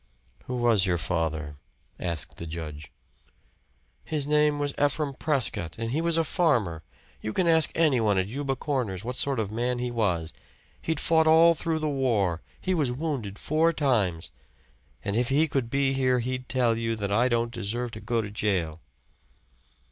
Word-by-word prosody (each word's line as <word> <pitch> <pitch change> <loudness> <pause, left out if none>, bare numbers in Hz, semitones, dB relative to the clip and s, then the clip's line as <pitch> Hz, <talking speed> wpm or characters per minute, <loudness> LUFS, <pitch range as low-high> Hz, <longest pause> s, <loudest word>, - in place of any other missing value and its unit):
"Who 125 - -4
was 115 -6 +3
your 90 -1 +1
father?" 80 -3 -2 0.4
asked 85 -5 0
the 85 - -6
judge. 75 -3 -7 1.1
"His 150 -3 -2
name 150 0 +3
was 145 -1 -1
Ephraim 145 0 0
Prescott, 130 - -1
and 115 0 -3
he 155 +5 0
was 170 0 +2
a 165 - +3
farmer. 120 - +1 0.4
You 110 - -4
can 185 - +1
ask 160 -1 +5
anyone 125 -11 +3
at 95 - +2
Euba 135 +4 -2
Corners 125 - -2
what 125 +1 -3
sort 135 -2 +1
of 105 -2 -2
a - - -8
man 120 +2 0
he 125 0 -2
was. 90 -8 -1 0.5
He'd 160 -2 -1
fought 160 -1 +3
all 165 +1 +7
through 165 0 -1
the 155 -1 -2
war 110 - 0 0.2
he 185 - -1
was 150 -8 +1
wounded 125 -8 -3
four 160 +2 +2
times. 105 - 0 0.7
And 100 - -1
if 120 +1 +1
he 150 +4 +3
could 135 -5 -1
be 135 +1 +1
here 130 -1 +2
he'd 130 +1 -3
tell 120 -3 +2
you 115 0 -1
that 100 -2 -3
I 115 +5 +3
don't 120 -1 0
deserve 120 +2 -3
to 110 - -8
go 115 -2 -1
to 105 - -7
jail." 90 -7 -1
120 Hz, 180 wpm, -27 LUFS, 100-145 Hz, 1.1 s, all